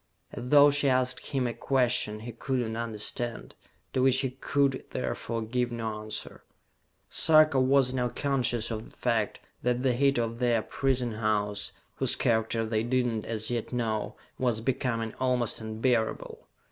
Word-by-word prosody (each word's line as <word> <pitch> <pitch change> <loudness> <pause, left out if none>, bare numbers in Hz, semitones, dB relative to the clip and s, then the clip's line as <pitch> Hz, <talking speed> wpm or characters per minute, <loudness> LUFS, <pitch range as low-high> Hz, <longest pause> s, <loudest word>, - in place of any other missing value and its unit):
As 125 - -6
though 145 0 +7
she 140 -1 +2
asked 130 0 0
him 135 -2 -1
a 120 - -1
question 120 -3 +1
he 120 +2 -6
could 130 +3 -2
not 115 +1 -3
understand, 115 +2 -4 0.4
to 130 - +1
which 130 0 +4
he 130 -2 -2
could 135 0 0
therefore 115 -2 -3
give 120 +2 -1
no 110 -2 -4
answer. 110 0 -7 0.6
Sarka 155 -3 +5
was 130 0 +3
now 125 -1 0
conscious 120 -5 0
of 110 0 -5
the - - -22
fact 115 -4 -1 0.2
that 125 +1 0
the 130 -2 +3
heat 140 +2 +2
of 115 0 -2
their 120 -3 +2
prison 130 -3 -1
house 105 -2 -1 0.3
whose - - +1
character 115 0 +1
they 110 -1 0
did 125 +2 +1
not 115 -3 -2
as 110 0 -3
yet 120 -2 -3
know 110 -3 -2 0.2
was 120 -4 +1
becoming 115 -2 -1
almost 125 -3 0
unbearable. 110 +1 -1
120 Hz, 160 wpm, -28 LUFS, 110-130 Hz, 0.6 s, though